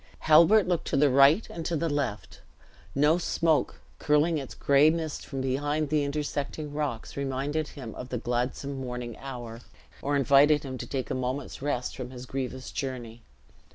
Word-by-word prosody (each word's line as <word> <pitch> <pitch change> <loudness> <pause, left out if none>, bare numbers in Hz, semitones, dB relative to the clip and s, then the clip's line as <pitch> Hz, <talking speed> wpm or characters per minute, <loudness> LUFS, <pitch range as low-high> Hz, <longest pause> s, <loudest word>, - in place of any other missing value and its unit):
Halbert 170 +7 +6
looked 175 -2 -1
to 140 - 0
the 145 -1 +4
right 140 - +5
and 165 - -5
to 170 - -1
the 165 +2 0
left; 145 -9 -3 0.5
no 150 +5 +4
smoke, 165 -2 0 0.2
curling 150 +2 +2
its 135 - -8
gray 140 +2 +5
mist 160 -2 -3
from 135 -1 -4
behind 145 +3 -1
the 150 -1 +2
intersecting 145 +1 -3
rocks, 145 -6 -3
reminded 140 +3 -2
him 120 -7 -8
of 125 - -8
the 125 - -2
gladsome 125 +3 -2
morning 125 -2 -5
hour, 120 -4 -7 0.4
or 145 +1 0
invited 140 +2 +5
him 130 -2 -5
to - - -6
take 130 -3 -3
a - - +1
moment's 130 +2 -3
rest 135 -3 -2
from 125 -2 -6
his 125 -1 -9
grievous 130 0 -5
journey. 120 -4 -5
140 Hz, 170 wpm, -28 LUFS, 130-150 Hz, 0.5 s, Halbert